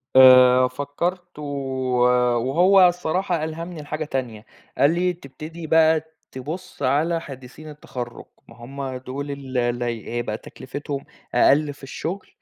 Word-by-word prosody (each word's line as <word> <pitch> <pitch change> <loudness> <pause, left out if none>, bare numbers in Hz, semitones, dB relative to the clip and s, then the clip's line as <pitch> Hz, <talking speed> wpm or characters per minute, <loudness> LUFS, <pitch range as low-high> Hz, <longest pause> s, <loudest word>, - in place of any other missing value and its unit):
آآ 130 -1 +8
فكرت 170 +7 -4
و - - -6 0.9
وهو 180 +10 +5
الصراحة 175 -1 -1
ألهمني 165 +1 -5
لحاجة 155 +1 -4
تانية، 120 -7 -4 0.3
قال 145 +3 +4
لي 180 +1 +1
تبتدي 160 +1 -9
بقى 160 0 +3 0.2
تبُص 160 +7 -7
على 155 +6 +1
حديِثيِن 135 +2 -10
التَّخرُّج، 125 -5 -7 0.2
ما - - -15
هُم 130 +2 -6
دول 135 +3 -6
ال 135 -2 -6
اللي 120 0 0 0.3
هيبقى 115 -3 -2
تكلفتهم 140 +3 -7 0.3
أقل 145 +1 +4
في 140 - -20
الشُّغل، 170 +8 -5
145 Hz, 125 wpm, -23 LUFS, 130-165 Hz, 0.9 s, آآ